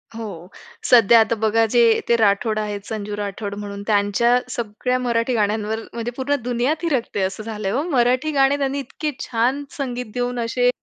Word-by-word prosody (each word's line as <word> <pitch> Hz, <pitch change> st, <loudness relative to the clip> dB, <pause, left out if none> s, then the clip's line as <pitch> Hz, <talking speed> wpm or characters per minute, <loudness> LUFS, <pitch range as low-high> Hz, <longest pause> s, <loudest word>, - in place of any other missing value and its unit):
हो, 195 Hz, -7 st, -7 dB, 0.4 s
सध्या 235 Hz, -1 st, +7 dB
आता 225 Hz, +1 st, +2 dB
बघा 220 Hz, +1 st, +2 dB
जे 235 Hz, -2 st, +5 dB
ते 235 Hz, -, +5 dB
राठोड 215 Hz, 0 st, +2 dB
आहेत, 210 Hz, -1 st, -3 dB
संजू 210 Hz, -1 st, -5 dB
राठोड 200 Hz, 0 st, -4 dB
म्हणून, 200 Hz, -1 st, -6 dB
त्यांच्या 215 Hz, +4 st, +3 dB
सगळ्या 240 Hz, +2 st, -2 dB
मराठी 235 Hz, 0 st, 0 dB
गाण्यांवर 215 Hz, +1 st, 0 dB
म्हणजे 235 Hz, 0 st, -4 dB
पूर्ण 285 Hz, +2 st, 0 dB
दुनिया 245 Hz, +4 st, 0 dB
थिरकते 260 Hz, -, -1 dB
असं 190 Hz, +3 st, -2 dB
झालंय 210 Hz, -3 st, -4 dB
हो. 270 Hz, +6 st, 0 dB
मराठी 255 Hz, +2 st, +2 dB
गाणे 275 Hz, 0 st, +3 dB
त्यांनी 275 Hz, 0 st, -1 dB
इतके 300 Hz, +3 st, -4 dB
छान 250 Hz, +5 st, 0 dB
संगीत 250 Hz, -5 st, -4 dB
देऊन 245 Hz, 0 st, -2 dB
असे 245 Hz, +2 st, +2 dB
230 Hz, 165 wpm, -21 LUFS, 210-250 Hz, 0.4 s, सध्या